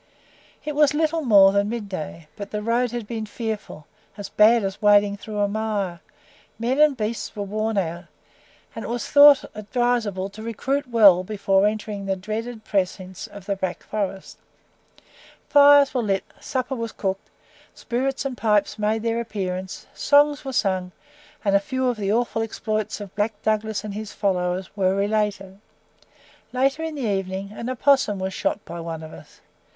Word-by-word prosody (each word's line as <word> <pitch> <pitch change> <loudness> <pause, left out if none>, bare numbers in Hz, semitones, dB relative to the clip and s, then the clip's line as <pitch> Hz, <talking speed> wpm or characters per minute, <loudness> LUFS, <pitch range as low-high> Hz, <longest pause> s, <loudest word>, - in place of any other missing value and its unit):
It 300 - -2
was 295 0 +3
little 320 +1 +1
more 200 -7 +6
than 200 +1 +1
mid 225 -2 -4
day, 165 -3 -7
but 200 -2 -7
the 210 0 -4
road 240 +2 +1
had 240 -1 -5
been 220 0 -5
fearful 215 -8 -5 0.3
as 205 - -7
bad 225 +1 +5
as 195 0 -4
wading 205 -1 +4
through 210 +1 -7
a 205 0 +2
mire; 205 -4 -2 0.6
men 245 +5 -1
and 300 -3 +5
beasts 220 +1 -3
were 205 - -3
worn 215 +2 -2
out, 170 -1 -2 0.7
and 225 - -5
it - - -5
was 240 0 -3
thought 285 -1 +7
advisable 215 -3 -1
to 210 +2 -11
recruit 265 +5 -2
well 200 -6 +6
before 195 0 +2
entering 210 -2 -4
the 195 - +1
dreaded 215 +4 -5
precincts 185 -1 -2
of 200 -2 -12
the 200 - -1
Black 185 -2 -4
Forest. 195 -2 -4 1.1
Fires 285 -1 +7
were 255 - +1
lit, 195 -3 0 0.2
supper 260 0 -3
was 230 -3 -4
cooked, 190 -1 -4 0.5
spirits 270 +3 -2
and 265 -2 -3
pipes 210 -2 +1
made 215 +1 0
their 230 0 0
appearance, 190 -4 -5
songs 290 0 +3
were 270 - -4
sung, 185 -6 0 0.5
and 200 -1 +3
a - - +6
few 260 +5 -2
of 245 -2 0
the 200 -1 -1
awful 230 0 0
exploits 215 -1 -3
of 200 -2 -9
Black 210 0 -1
Douglas 215 0 0
and 210 -1 -6
his 215 +1 -6
followers 185 -1 -1
were 190 -2 +1
related. 200 -1 -1 0.9
Later 270 +4 +1
in 320 -1 -4
the 285 - -5
evening, 195 -1 -2
an 235 +3 -6
opossum 260 -4 +2
was 190 0 -3
shot 200 - -2
by 170 0 -7
one 165 -1 -6
of 160 - -10
us. - - -15
210 Hz, 170 wpm, -23 LUFS, 195-235 Hz, 1.1 s, thought